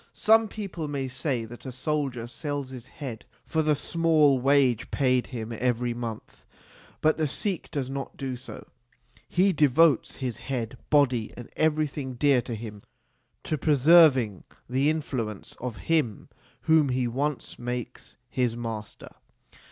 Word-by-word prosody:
Some 225 +1 +4
people 195 -7 -5
may 140 -2 -3
say 130 -2 -2
that 120 +2 -11
a 130 - -6
soldier 130 -2 -2
sells 145 +1 -5
his 130 -1 -9
head 125 -7 -7 0.2
for 160 - 0
the 155 -1 +2
small 155 -4 +3
wage 135 -3 +3
paid 130 -3 +1
him 115 -2 -5
every 120 +1 0
month. 115 -2 -7 0.6
But 155 0 +3
the 155 -1 +1
Sikh 185 +6 -3
does 140 -3 -3
not 135 0 -6
do 135 -2 -3
so: 125 +1 -10 0.6
he 190 +2 +3
devotes 150 -1 +4
his 125 -4 -4
head, 125 -2 -4
body, 130 -7 +3
and 120 - -9
every 155 0 +2
thing 135 -2 -5
dear 135 0 +3
to 120 -1 -5
him 105 -2 -8 0.6
to 155 - -2
preserving 145 - +5 0.2
the 135 +4 +2
influence 125 -10 -3
of 125 -3 -4
him 155 -10 0 0.3
whom 160 -3 +4
he 125 -1 0
once 140 +4 -3
makes 125 0 -6
his 125 -2 -1
master. 110 -2 -6
130 Hz, 145 wpm, -27 LUFS, 120-150 Hz, 0.6 s, preserving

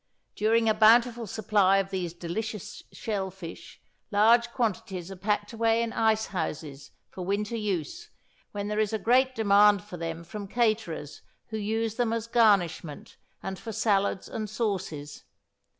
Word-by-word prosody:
During 225 +2 +2
a 220 - +5
bountiful 230 +2 +4
supply 195 -2 +2
of 195 0 -1
these 180 -3 -2
delicious 180 +5 -5
shell 200 -4 -3
fish, 180 -3 -10 0.3
large 230 +3 +4
quantities 195 -6 -2
are - - -6
packed 205 +3 -1
away 225 0 +2
in 230 - -4
ice 220 -1 +2
houses 155 -5 -5 0.2
for 185 - -6
winter 210 +4 -1
use, 205 - -3 0.4
when 205 -1 -4
there 210 0 -1
is 215 0 +1
a - - +1
big 255 +4 +3
demand 205 -2 +5
for 205 -4 -9
them 165 0 -5
from 200 +4 -7
caterers 215 - -1 0.3
who 220 - -4
use 220 +1 -2
them 240 -2 +1
as 230 -1 -2
garnishment, 195 -10 +1 0.3
and 190 -1 -5
for 225 - -6
salads 200 -2 +1
and 215 -2 -5
sauces. 190 -10 -3
210 Hz, 150 wpm, -27 LUFS, 190-225 Hz, 0.4 s, a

